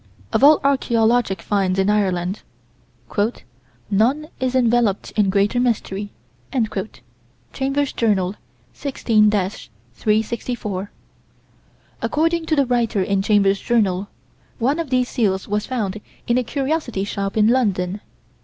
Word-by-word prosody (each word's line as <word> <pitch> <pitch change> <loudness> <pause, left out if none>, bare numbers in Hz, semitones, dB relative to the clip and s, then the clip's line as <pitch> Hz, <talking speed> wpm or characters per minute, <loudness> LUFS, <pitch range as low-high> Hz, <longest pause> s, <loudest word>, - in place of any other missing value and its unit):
Of - - +2
all 300 +1 +8
archaeologic 235 -7 +2
finds 195 -2 0
in 190 0 +2
Ireland, 190 -2 0 1.5
"none 260 +10 +2
is 260 0 -1
enveloped 235 -5 +2
in 210 -3 +2
greater 200 +5 +2
mystery." 210 -4 -1 1.4
(Chambers' 275 +1 -1
Journal, 195 -5 +1 0.4
16 225 - +2
364.) 205 - -2 1.1
According 330 +2 0
to 315 - +2
the 280 -2 +3
writer 235 -5 +1
in 195 +1 0
Chambers' 200 -1 +2
Journal, 200 -5 +1 0.5
one 275 +6 +1
of 330 -4 -3
these 255 -1 +2
seals 195 -7 0
was 210 0 -1
found 215 -5 -3 0.2
in 240 +1 +2
a - - -1
curiosity 270 -5 -2
shop 200 0 -3
in 215 0 +5
London. 205 -6 +1
215 Hz, 115 wpm, -21 LUFS, 195-255 Hz, 1.5 s, all